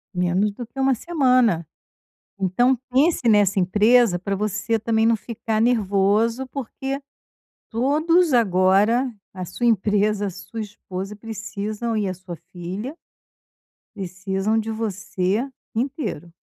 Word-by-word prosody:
Menos 180 +4 +1
do 240 +3 -7
que 270 - -11
1 265 -1 +3
semana. 250 - +2 0.7
Então 240 +8 +3 0.2
pense 270 -1 +3
nessa 205 -3 +4
empresa 210 +1 +4
pra 200 +2 -2
você 210 +3 -1
também 220 0 +1
não 230 0 +4
ficar 225 0 -3
nervoso, 225 +2 +2
porque 270 +1 -5 0.7
todos 305 +7 +2
agora, 210 +3 +3 0.2
a 185 - -5
sua 210 +7 -3
empresa, 210 -1 +2
a 195 - -2
sua 195 +5 -8
esposa 200 -1 -6
precisam 220 +1 -4
e 210 - 0
a 185 - -2
sua 180 -1 -9 0.2
filha, 190 - -5 1.0
precisam 195 +2 -2
de 225 0 -2
você 210 +1 -2 0.3
inteiro. 230 - -3
215 Hz, 120 wpm, -23 LUFS, 195-240 Hz, 1.0 s, nessa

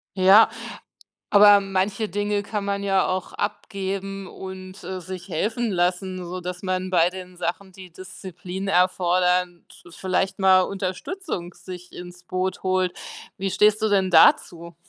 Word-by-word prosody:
Ja. 195 +4 +7 0.8
Aber 205 0 +8
manche 195 +2 -1
Dinge 205 +1 -1
kann 205 -1 -4
man 200 0 -2
ja 195 -1 +2
auch 185 0 -3
abgeben 195 -1 -4
und, 190 0 -9
äh, 185 +1 -5
sich 180 +1 -8
helfen 220 +7 -1
lassen, 180 +1 -1
sodass 180 +1 -6
man 185 0 -2
bei 175 -1 +3
den 185 -1 -10
Sachen, 180 +2 -4
die 185 -1 -12
Disziplin 185 +1 -8
erfordern, 180 -1 +1
zu 175 - -16
vielleicht 190 +2 -2
mal 190 -1 +5
Unterstützung 190 - -5
sich 180 0 -11
ins 180 0 -10
Boot 185 +1 -3
holt. 185 -1 0 0.4
Wie 195 0 -2
stehst 210 +3 +3
du 220 - +2
denn 195 -2 +2
dazu? 170 0 +4
185 Hz, 140 wpm, -23 LUFS, 180-195 Hz, 0.8 s, Aber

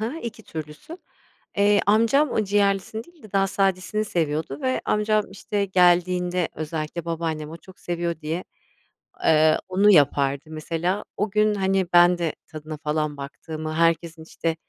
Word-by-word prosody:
ha, 325 - -6
2 230 -1 -7
türlüsü. 155 - -9 0.6
Eee, 205 0 +4
amcam 230 +7 +3
o 215 - 0
ciğerlisini 200 +2 0
değil 345 -3 -22
de 215 - -14
daha 195 -1 +3
sadesini 195 +2 0
seviyordu 160 - -2
ve 255 0 0
amcam, 210 0 +1
işte, 200 +1 -2
geldiğinde 180 -1 +2
özellikle 155 +1 -4
babaannem 160 -2 -3
o 165 - -8
çok 185 +2 -17
seviyor 170 -2 -3
diye, 160 +4 -3 0.8
eee, 155 0 +5
onu 195 +3 +4
yapardı, 140 -4 +3
mesela. 165 +5 -2
O 210 +1 0
gün, 215 0 +3
hani, 190 -2 +1
ben 175 0 +6
de 170 -3 -1
tadına 155 0 -8
falan 150 0 -2
baktığımı, 155 +3 -6
herkesin, 165 0 +1
işte, 165 0 -3
175 Hz, 145 wpm, -24 LUFS, 160-200 Hz, 0.8 s, ben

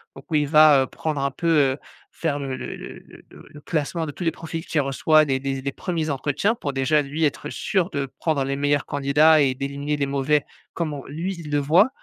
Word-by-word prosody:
donc - - -12
où - - +1
il 150 -1 +2
va, 150 -2 +6
heu, - - -5
prendre 150 0 -3
un 140 - +1
peu, 170 +5 -4 0.3
heu, - - -8 0.3
faire 145 -3 -2
le 135 -2 -4
le - - -6
le - - -9 0.3
le - - -15
le 150 - -13
classement 160 +2 -2
de - - -4
tous 175 - -7
les 165 - +1
profils 165 0 -7
qu'il 155 - 0
reçoit, 155 +3 +3
les 135 -2 0
les 135 0 -3
les 140 +1 -3
1ers 165 0 -3
entretiens 145 - 0
pour 145 -10 -4
déjà, 140 +3 +2
lui, 145 +3 -3
être 145 0 -2
sûr 185 -3 0
de 140 -1 -2
prendre 155 -4 0
les 135 +1 -2
meilleurs 145 0 +1
candidats 150 +3 +4
et 135 -2 +2
d'éliminer 140 +2 -3
les 140 - 0
mauvais, 140 +1 +1 0.3
comment 150 -5 -3
lui 170 +7 -4
il 155 -3 -8
le 145 - +2
voit, 165 - +4
145 Hz, 230 wpm, -23 LUFS, 140-160 Hz, 0.3 s, va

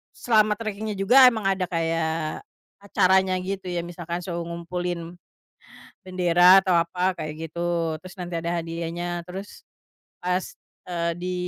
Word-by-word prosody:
selama 215 -3 +3
trekingnya 215 -1 -4
juga 245 +7 +7
emang 220 -4 -4
ada 190 -1 +1
kayak 165 -2 -1 0.4
acaranya 190 -1 +3
gitu 190 0 -4
ya, 175 -1 -1
misalkan 175 0 -5
suruh 170 -1 -4
ngumpulin, 170 0 -4 0.9
bendera 180 0 +6
atau 185 - +2
apa 180 +2 0
kayak 155 0 -4 0.2
gitu, 170 -1 -1
terus 185 -1 -11
nanti 175 -1 -5
ada 170 +1 -3
hadiahnya 170 +1 -4
terus, 190 +3 -9 0.6
pas, 180 +1 0 0.4
eee, 170 -1 -1
di 180 +1 -3
180 Hz, 130 wpm, -24 LUFS, 170-190 Hz, 0.9 s, juga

